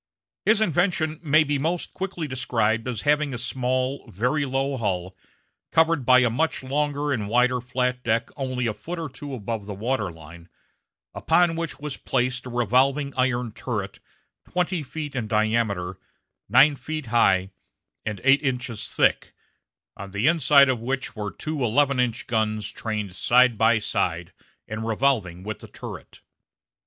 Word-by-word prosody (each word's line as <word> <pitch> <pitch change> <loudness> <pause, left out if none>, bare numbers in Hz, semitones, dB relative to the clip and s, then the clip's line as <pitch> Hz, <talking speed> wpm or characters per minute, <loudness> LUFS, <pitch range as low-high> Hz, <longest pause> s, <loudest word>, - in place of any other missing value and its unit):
His 215 0 +4
invention 170 -4 +1
may 155 -1 +4
be 145 -1 -1
most 165 +4 -2
quickly 185 -4 -4
described 115 -3 0
as 120 -4 -3
having 150 -2 +2
a - - -3
small, 130 +2 -2
very 125 +10 0
low 135 +1 -1
hull, 95 -4 -2 0.6
covered 160 -5 +3
by 130 0 +7
a 120 - +3
much 160 +4 -1
longer 145 +2 -1
and 105 -5 -3
wider 125 +2 +3
flat 125 0 -1
deck 115 0 0
only 130 -2 -2
a 110 - 0
foot 175 +10 -7
or 165 -3 -4
two 140 +1 -7
above 110 -2 -5
the 100 - -5
water 110 -2 -1
line, 85 +1 -13 0.6
upon 165 0 +2
which 165 0 -4
was 150 -1 -5
placed 125 0 -1
a - - -6
revolving 130 +4 +2
iron 125 -2 0
turret 110 -4 -5 0.5
twenty 180 -1 0
feet 150 0 -6
in 115 -4 -2
diameter, 105 -4 0 0.5
nine 135 +6 +6
feet 155 +3 -5
high, 95 -5 +3 0.5
and 105 -3 -4
eight 135 +2 +5
inches 125 -5 -3
thick, - - +1 0.6
on 100 0 -8
the 100 +4 -2
inside 150 -3 +6
of 130 -3 0
which 130 0 -3
were 105 -2 -3
two 155 - -4
eleven 135 +3 +2
inch 125 -2 0
guns 110 -2 -1
trained 105 -4 -4
side 125 +5 +4
by 110 +1 +4
side 90 -5 -2 0.3
and 110 +1 -5
revolving 110 -7 0
with 110 0 -5
the - - -11
turret. - - -10
125 Hz, 155 wpm, -24 LUFS, 110-145 Hz, 0.6 s, by